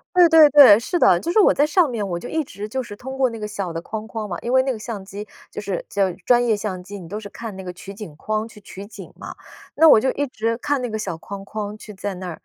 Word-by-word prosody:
对 355 -1 +7
对 320 -2 +8
对， 270 -8 +9
是 350 +9 -2
的。 175 - +5
就 335 - -3
是 395 - +2
我 415 - +5
在 290 - +3
上 330 +1 +3
面， 225 -5 -3
我 175 -2 -3
就 - - -8
一 320 0 -1
直 210 -5 -8
就 260 +4 -3
是 210 -4 -10
通 265 +4 -8
过 260 -2 +2
那 230 - -7
个 210 - -4
小 200 -4 -5
的 165 - -4
框 220 +4 -6
框 220 -2 -5
嘛， 175 - -4
因 240 - -3
为 260 0 +5
那 265 - -1
个 230 - -7
相 215 -3 -6
机 205 +2 -8 0.2
就 - - -6
是 200 -4 -4
就 195 -2 0
专 245 -1 +4
业 225 -3 +2
相 190 -3 -5
机， 200 +2 -9
你 170 - -11
都 210 +4 -5
是 205 - -9
看 225 0 -8
那 190 - -7
个 180 - -6
取 190 +2 -10
景 195 -8 -10
框 215 +6 -3
去 210 - -15
取 195 0 -10
景 225 - -12
嘛， - - -9 0.4
那 320 +2 +7
我 220 - +8
就 260 - +1
一 285 - -2
直 230 -3 -2
看 285 +2 -1
那 245 - -3
个 220 - -3
小 175 - -4
框 195 +2 -8
框 210 0 -5
去 210 -1 -11
在 195 +1 -5
那 185 0 -7
儿。 165 - -8
215 Hz, 325 characters per minute, -21 LUFS, 195-255 Hz, 0.4 s, 对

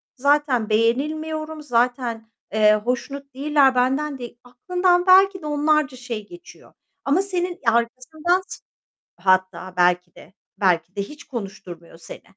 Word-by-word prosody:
zaten 275 -4 +1
beğenilmiyorum, 310 +8 -1
zaten, 240 -3 -1 0.2
eee, 215 -1 +5
hoşnut 255 +5 -4
değiller 275 -1 +3
benden 270 +3 0
değ" 240 -1 -8
Aklından 355 +8 0
belki 380 0 +6
de - - -10
onlarca 295 -2 +1
şey 235 -4 -6
geçiyor 350 +1 -15 0.3
ama 295 +7 +3
senin 360 -2 -3
Ya, 230 - +4
arkasından 300 +10 0
s - - -8 0.6
Hatta 185 0 0
belki 180 -1 +2
de, 175 - -16 0.3
belki 185 0 +1
de 200 - -1
hiç 295 +9 -11
konuşturmuyor 190 - -9
seni. 165 - -11
255 Hz, 130 wpm, -22 LUFS, 215-305 Hz, 0.6 s, belki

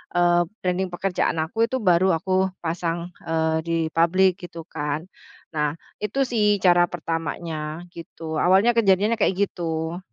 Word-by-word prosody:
eee, 175 0 +4 0.2
branding 185 +1 0
pekerjaan 180 -2 -1
aku 225 +8 0
itu 260 - -1
baru 180 -1 +4
aku 190 +2 +1 0.2
pasang, 170 +1 -2 0.2
eee, 160 0 +1
di 165 0 +1 0.2
public 185 +3 +3
gitu 165 -1 -9
kan 150 0 -3 0.5
nah 150 0 0 0.3
itu 270 +7 +1
sih 210 -3 +2
cara 175 -1 +6
pertamanya 165 -1 -4
gitu 160 -1 -6
awalnya 195 +6 +5
kejadiannya 210 +1 +3
kayak 190 - +2 0.2
gitu. 165 0 -3
175 Hz, 135 wpm, -23 LUFS, 160-190 Hz, 0.5 s, cara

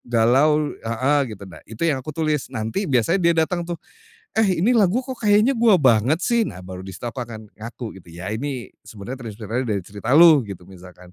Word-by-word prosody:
galau 135 +6 +2
heeh, 130 +6 +1 0.2
gitu. 100 - -11
Nah 90 -5 -12
itu 110 +8 -4
yang 150 -5 +1
aku 130 - -15
tulis, 155 -3 -1
nanti 110 - -3
biasanya 130 - +2
dia 170 -1 +3
datang 175 +2 -3
tuh, 175 - -3 0.6
"Eh, 210 -5 +2
ini 245 - +4
lagu 225 +2 +2
kok, 255 -2 -7
kayaknya 210 +4 +4
gue 230 -4 +4
banget 130 -2 +3
sih?" 235 -1 +2
Nah, 90 -5 -10
baru 90 0 -8
di 95 - -10
situ - - -11
aku 120 +2 -4
akan 110 -3 -9
ngaku 115 -2 -8
gitu. 85 - -21
"Iya, 95 +4 -5
ini 130 +1 -5
sebenernya 115 +5 -9
terinspirasi 115 +2 -4
dari 100 -3 -1
cerita 105 +8 -1
Lu," 165 -3 +8
gitu, 90 -2 -8
misalkan. 90 -1 -15
125 Hz, 205 wpm, -22 LUFS, 110-165 Hz, 0.6 s, Lu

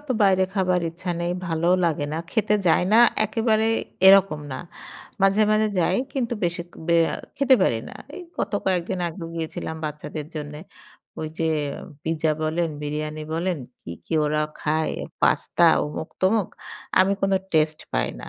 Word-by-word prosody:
অত 295 - -22
বাইরে 190 -1 +4
খাবার 185 -2 +2
ইচ্ছা 175 +2 -6
নেই, 170 0 -1 0.2
ভালোও 170 +2 +2
লাগে 155 -3 0
না। 155 - -2
খেতে 215 -2 +1
যাই 170 - +4
না 225 - +7 0.3
একেবারে 220 0 +1 0.4
এরকম 190 -5 +6
না, 130 - -4 0.6
মাঝে, 195 +2 +4
মাঝে 215 0 +3
যাই। 175 +2 +2 0.2
কিন্তু 245 -3 -1
বেশি 170 0 -2 0.2
বে 170 -1 +4 0.2
আ - - -4 0.2
খেতে 275 -2 +5
পারি 115 - +2
না। - - -10 0.2
এই - - -7 0.2
গতো 205 - -1
কয়েকদিন 185 0 0
আগেও 165 0 -7
গিয়েছিলাম 160 -1 -4
বাচ্চাদের 150 0 -5
জন্যে। 150 -1 -6 0.6
ওইযে 160 +1 -3 0.6
পিজ্জা 160 -1 +1
বলেন, 165 +2 0
বিরিয়ানি 150 +1 -4
বলেন, 175 +2 -1 0.3
কী, 85 - -7
কী - - -2
ওরা 150 0 +1 0.2
খায় 155 +1 0 0.3
পাস্তা, - - +2 0.2
অমুক-তমুক। 185 +7 -1 0.5
আমি 190 +1 +4
কোনো 195 0 +3 0.2
টেস্টই 155 -1 +1
পাই - - +1
না, - - -8
170 Hz, 155 wpm, -24 LUFS, 155-195 Hz, 0.6 s, না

